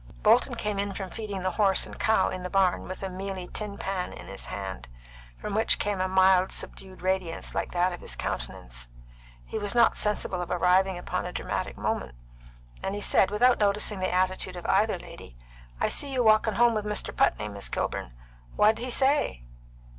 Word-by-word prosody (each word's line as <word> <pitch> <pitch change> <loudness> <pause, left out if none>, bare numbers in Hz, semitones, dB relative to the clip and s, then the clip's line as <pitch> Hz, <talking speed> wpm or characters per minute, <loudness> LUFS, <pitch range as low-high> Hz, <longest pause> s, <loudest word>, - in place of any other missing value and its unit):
Bolton - - +4
came 210 -1 -2
in 200 0 -2
from 190 -2 -5
feeding 205 -4 -5
the 185 - 0
horse 195 0 +3
and - - -11
cow 220 - +3
in 185 - -5
the 180 - -5
barn, 190 -1 +2
with 185 +1 -7
a 190 - -2
mealy 190 0 -5
tin 210 0 -5
pan 190 -2 -3
in - - -10
his 95 0 -6
hand, 95 -12 -6 0.5
from 210 - -5
which 220 +2 +3
came 205 -2 -1
a 185 - +1
mild, 190 0 +4
subdued 190 -1 -5
radiance 185 -3 -1
like - - -2
that 180 +1 +1
of 175 - -8
his - - 0
countenance. - - -5 0.6
He - - -4
was 205 +2 -2
not 235 - +5
sensible 210 -3 0
of 175 - -5
arriving 185 +1 +3
upon 175 - -3
a - - -5
dramatic - - -3
moment, 60 - -2 0.7
and 195 - -2
he - - -3
said, 190 - +4
without 240 +5 +3
noticing 205 0 +2
the 185 - -1
attitude 185 0 0
of 175 - -8
either - - +2
lady: - - -12 0.4
"I - - +2
see 285 - 0
you 255 -2 +1
walkin' 215 -1 +4
home 240 +2 +5
with 215 -1 -1
Mr. 210 0 -2
Putney, 105 - +2
Miss 100 -1 -5
Kilburn. - - -3 0.4
What'd 215 +1 +4
he 255 - -3
say?" 265 - +1
190 Hz, 195 wpm, -27 LUFS, 180-210 Hz, 0.7 s, not